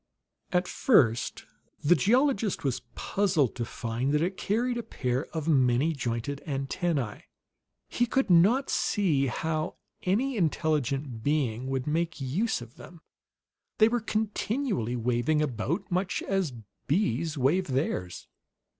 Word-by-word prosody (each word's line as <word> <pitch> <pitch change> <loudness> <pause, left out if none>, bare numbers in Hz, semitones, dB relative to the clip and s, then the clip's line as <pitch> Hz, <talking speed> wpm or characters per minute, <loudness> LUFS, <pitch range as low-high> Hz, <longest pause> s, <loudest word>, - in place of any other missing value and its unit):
At 180 0 +1
first 120 - +2 0.4
the 155 - +6
geologist 215 - +2
was 135 -4 -1
puzzled 180 - +1
to 120 - -3
find 115 +3 -2
that 150 - +2
it 185 +2 -1
carried 240 +6 0
a - - -1
pair 130 - -2
of 160 -2 -5
many 135 +1 +3
jointed 130 +1 -3
antennae. 135 - -2 0.6
He 240 - 0
could 270 +3 +1
not 205 +10 +4
see 155 -10 +1
how 155 +5 -2 0.3
any 235 +8 0
intelligent 145 - 0
being 130 -4 0
would 135 -1 -2
make 165 +2 -1
use 150 - -1
of 120 0 -15
them; 170 -2 -13 0.8
they 215 - +6
were 240 0 0
continually 215 - -1
waving 125 +6 +1
about, 140 - -2
much 185 +1 -1
as 195 -6 0 0.4
bees 155 - 0
wave 150 +8 +2
theirs. 130 - -2
155 Hz, 130 wpm, -28 LUFS, 130-195 Hz, 0.8 s, the